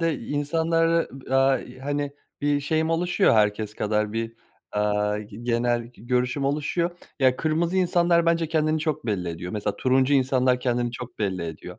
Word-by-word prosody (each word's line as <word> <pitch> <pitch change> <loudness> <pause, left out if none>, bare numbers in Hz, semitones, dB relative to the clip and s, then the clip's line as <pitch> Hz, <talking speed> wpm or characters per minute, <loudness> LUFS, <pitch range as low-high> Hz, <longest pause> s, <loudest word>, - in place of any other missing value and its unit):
de 165 -4 0
insanları, 165 +5 +1 0.2
aaa, 135 0 +4
i - - -11
hani, 145 +1 -2 0.3
bir 145 0 +1
şeyim 160 +3 0
oluşuyor, 175 - +3
herkes 105 0 +1
kadar 105 0 0
bir, 115 0 -3 0.4
aaa, 105 0 +1
g 105 -1 -9
genel 120 0 +1
g 120 -3 -18
görüşüm 125 +3 0
oluşuyor. 150 +5 0 0.3
Ya, 130 -2 +3
kırmızı 165 +4 0
insanlar, 175 -2 +3
bence, 165 -1 +2
kendini 155 -1 +1
çok 155 -6 -2
belli 95 -5 -1
ediyor, 85 +2 -6
mesela, 105 -1 -2
turuncu 130 +2 +3
insanlar 130 -1 +2
kendini 120 -1 0
çok 125 0 -8
belli 95 -4 -1
ediyor. 80 -2 -8
130 Hz, 165 wpm, -25 LUFS, 110-155 Hz, 0.4 s, aaa